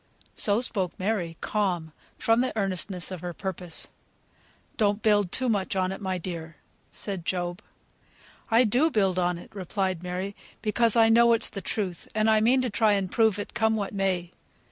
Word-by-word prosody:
So 205 +2 +1
spoke 195 -8 -1
Mary, 185 -5 -1
calm, 180 -7 -1 0.3
from 225 +1 +3
the 255 -3 -2
earnestness 190 -2 -2
of 185 -3 -6
her 175 -1 -4
purpose. 180 -3 -3 0.8
"Don't 205 0 +1
build 205 -4 +3
too 260 - +1
much 200 -4 0
on 185 0 +1
it, 195 - -6
my 190 -2 -1
dear," 165 -2 -6 0.3
said 195 -4 -5
Job. 175 +2 -2 0.9
"I 230 +2 +5
do 250 +8 +3
build 195 - +1
on 175 -1 +1
it," 175 - -13
replied 190 -2 -2
Mary, 185 +3 -4 0.3
"because 225 +1 +2
I 225 -1 +6
know 235 +1 +6
it's 230 - +1
the 195 - -5
truth, 190 -5 -3
and 215 +1 +3
I 215 - +5
mean 250 +4 +3
to 250 - 0
try 215 0 +3
and 195 -2 -1
prove 220 -3 +3
it, 205 - -6
come 220 -1 +2
what 205 -1 -3
may. 185 -3 -1
195 Hz, 180 wpm, -27 LUFS, 180-220 Hz, 0.9 s, I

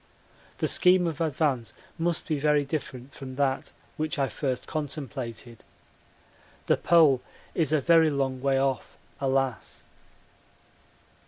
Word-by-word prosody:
The - - 0
scheme 180 -1 +4
of 165 -2 -3
advance 145 -6 0 0.2
must 170 0 -1
be 155 -3 0
very 150 0 +2
different 135 -2 -5
from 130 -1 -8
that 135 -1 0 0.3
which 155 0 -2
I 135 -2 +1
first 130 -4 -3
contemplated. 130 -6 -6 1.0
The - - +3
Pole 155 -7 +5 0.3
is 160 -3 0
a 155 -2 +3
very 165 +1 +5
long 135 -3 -1
way 135 0 +2
off, 135 -2 -1 0.2
alas! 135 -3 -1
140 Hz, 120 wpm, -27 LUFS, 130-155 Hz, 1.0 s, Pole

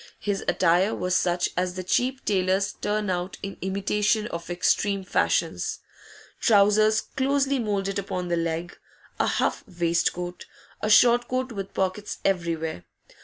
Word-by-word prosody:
His 200 -1 -2
attire 185 +4 +3
was 180 0 -1
such 175 -1 +1
as 180 0 -1
the 185 - -4
cheap 255 +8 0
tailors 190 0 +1
turn 210 -2 -2
out 180 +1 -3
in 195 0 -5
imitation 205 +3 0
of 170 0 -6
extreme 195 +3 +1
fashions: 185 - 0 0.6
trousers 215 0 +4
closely 275 0 0
moulded 200 -3 -1
upon 180 -2 -4
the 175 - 0
leg, 165 +1 -2 0.4
a - - +2
huff - - 0
waistcoat, 175 0 -1 0.3
a 215 - -1
short 240 +3 +5
coat 255 0 -2
with 195 -3 -6
pockets 190 +2 -2
everywhere. 165 - -1
195 Hz, 135 wpm, -25 LUFS, 180-210 Hz, 0.6 s, short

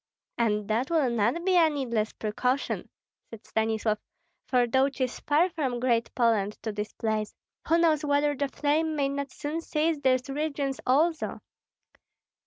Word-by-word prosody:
"And 210 -3 +1
that 230 +5 0
will 310 -7 +2
not 235 - 0
be 380 -1 +3
a 330 -2 +6
needless 235 -7 -1
precaution," 250 +5 -2 0.4
said 225 -1 -11
Stanislav; 220 -1 0 0.5
"for 250 -2 +3
though 265 +3 +2
'tis 260 -2 -3
far 305 +4 +3
from 265 -7 -2
Great 235 -2 +1
Poland 220 -4 +2
to 220 - -2
this 210 0 -4
place, 215 -1 -2 0.3
who 330 - +4
knows 320 -3 +3
whether 290 0 +2
the 280 +1 -1
flame 305 +3 0
may 280 -2 +1
not 280 0 -3
soon 305 +2 -4
seize 315 -1 0
these 255 -1 +2
regions 280 -1 -2
also?" 315 +5 +1
270 Hz, 155 wpm, -27 LUFS, 230-300 Hz, 0.5 s, a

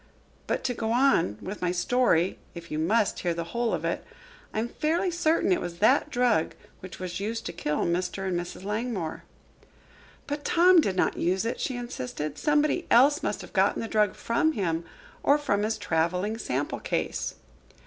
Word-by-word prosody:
But - - -1
to 250 - 0
go 225 -1 -2
on 240 - +3
with 200 +2 -6
my 180 -1 +1
story, 185 -2 +2 0.2
if 170 0 -9
you 155 - -2
must 205 +6 +1
hear 175 -2 -1
the 170 - -2
whole 235 +7 -1
of - - -2
it. - - -1 0.5
I - - -6
am 225 +2 0
fairly 335 +8 0
certain 330 - +2
it 180 - +2
was 175 -1 -5
that 210 - +3
drug 245 -9 +1 0.2
which 185 0 -9
was 180 0 -5
used 225 +3 -3
to 170 - -4
kill 150 -3 -1
Mr. 180 +3 -1
and 185 - -1
Mrs. 175 +1 -5
Langmore." 210 -5 -3 1.0
"But 290 0 -4
Tom 350 +2 +6
did 195 -10 -1
not - - +1
use 185 +4 0
it," 230 - -2
she 255 - -2
insisted. 155 - -5
"Somebody 300 +3 +1
else 285 +6 +5
must - - -2
have - - -12
gotten - - +2
the 225 - -3
drug 210 -2 +2
from 275 +7 +1
him 170 - -1 0.4
or 285 - +4
from 205 -9 0
his 215 +1 0
traveling 180 +4 0
sample 140 - -2
case." - - -2
210 Hz, 185 wpm, -27 LUFS, 175-250 Hz, 1.0 s, Tom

